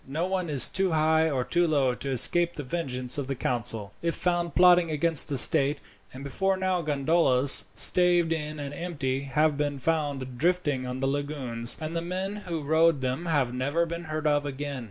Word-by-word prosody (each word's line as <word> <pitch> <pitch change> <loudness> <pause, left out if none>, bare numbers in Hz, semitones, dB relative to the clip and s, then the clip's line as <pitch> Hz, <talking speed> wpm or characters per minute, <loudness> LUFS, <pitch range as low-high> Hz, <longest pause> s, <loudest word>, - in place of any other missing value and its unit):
No 155 +6 -2
one 185 -2 -3
is 140 -5 +6
too 190 -2 -1
high 160 +1 +2
or 130 -4 -1
too 175 +6 0
low 140 -5 +1
to 135 +2 -6
escape 170 +7 +2
the 145 - -7
vengeance 130 -4 -2
of 135 - -4
the 135 - -3
council, 115 -5 -3
if 170 0 -1
found 175 -1 -2
plotting 180 -1 +5
against 155 0 +3
the 140 - -2
state; 140 +2 +5 0.3
and 130 +1 -10
before 190 +8 -1
now 185 -1 -1
gondolas, 145 -3 +2
staved 175 -2 +2
in 150 -1 -5
and 140 0 -6
empty, 140 -7 -3
have 145 +2 0
been 145 -1 -2
found 135 -4 -3
drifting 150 -6 0
on 125 +1 -5
the 135 - 0
lagoons, 135 -5 -2
and 160 +1 -6
the 165 - -1
men 185 +4 -4
who 165 -3 -4
rowed 160 0 +2
them 130 +7 -3
have 140 -7 0
never 140 +7 -1
been 170 +1 -7
heard 155 0 -5
of 145 -1 +1
again. 145 -1 -5
150 Hz, 195 wpm, -26 LUFS, 135-170 Hz, 0.3 s, is